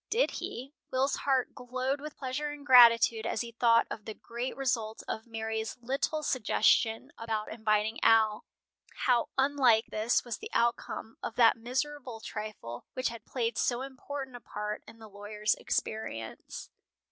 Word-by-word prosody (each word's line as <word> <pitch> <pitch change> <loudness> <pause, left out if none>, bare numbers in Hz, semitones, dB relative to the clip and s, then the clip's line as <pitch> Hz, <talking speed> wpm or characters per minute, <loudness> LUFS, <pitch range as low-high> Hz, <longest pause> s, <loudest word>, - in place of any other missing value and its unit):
Did 480 +3 +2
he? 265 +4 -6 0.2
Will's 265 +2 +1
heart 265 -3 0
glowed 255 +3 -3
with 300 0 -8
pleasure 270 +3 -3
and 290 -1 -8
gratitude 230 -3 +7
as - - -1
he 235 -1 -5
thought 230 0 +4
of 210 - -6
the 220 - -6
great 240 +2 -5
result 235 -5 -1
of 220 +2 -4
Mary's 220 0 -3
little 275 +5 -1
suggestion 225 -3 +2
about 220 -2 -3
inviting 220 0 0
Al. 220 -1 +4 0.6
How 245 -2 +3
unlike 265 -5 +4
this 220 +4 +1
was 235 -3 -4
the - - -7
outcome 235 -1 -1
of 225 - -5
that 230 -2 +6
miserable 255 +1 -3
trifle 210 - -7
which 255 -1 0
had 235 -1 -9
played 235 -3 -2
so 245 +1 +1
important 270 0 -7
a - - -7
part 210 0 -5
in 230 - -13
the 220 -1 -12
lawyer's 210 +1 -1
experience. 115 - -4
235 Hz, 155 wpm, -30 LUFS, 220-260 Hz, 0.6 s, gratitude